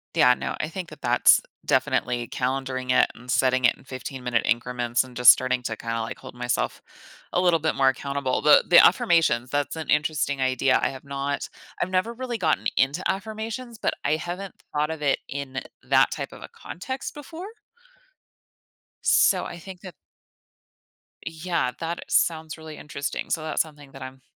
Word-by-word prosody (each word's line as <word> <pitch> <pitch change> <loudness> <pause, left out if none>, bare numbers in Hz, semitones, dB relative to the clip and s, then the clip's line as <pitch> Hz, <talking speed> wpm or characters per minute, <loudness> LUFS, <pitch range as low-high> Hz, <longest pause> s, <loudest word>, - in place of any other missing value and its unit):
Yeah, 125 - +6
no, - - -4
I 155 - -2
think 175 +1 -6
that 155 -1 -13
that's 120 0 +5 0.2
definitely 120 -1 0
calendaring 130 +1 -3
it - - +5
and 125 +2 -15
setting 130 0 +2
it - - +4
in - - -20
15-minute 130 -2 -3
increments 120 0 0
and 130 -1 -14
just 125 0 +9
starting 130 0 0
to 115 -2 -3
kinda, 115 0 -3
like, 115 - -5
hold - - -11
myself 120 0 -2 0.5
a - - +1
little 175 -2 +3
bit 160 0 0
more 135 -1 +4
accountable, 140 0 -2
but 150 -1 +6
the 170 - +9
affirmations, 155 -9 +3
that's 145 +1 -1
an 160 -2 -6
interesting 150 -2 +1
idea, 130 0 +2
I - - +1
have 130 -1 -9
not 140 0 -3 0.3
I've 185 - -1
never 185 +5 +1
really 245 -1 -4
gotten 160 -5 +1
into 140 +7 +1
affirmations, 220 +4 -6
but - - 0
I 150 - +2
haven't 175 +4 -6 0.2
thought 150 +1 0
of 160 -2 -5
it 140 - +2
in 135 -2 -5 0.2
that - - +4
type - - -5
of - - -12
a - - -9
context 260 +9 -6
before 320 +5 -9 1.6
so - - +4
I 175 - -7
think 180 +1 -11
that 185 -2 -10 1.3
Yeah. 165 -5 -1
That 170 +1 -4
sounds 160 -1 +1
really 160 -1 -10
interesting, 140 -1 -5
so 165 - 0
that's 155 -1 0
something 145 -3 -8
that - - -12
I'm 130 0 -9
145 Hz, 175 wpm, -25 LUFS, 130-170 Hz, 1.6 s, just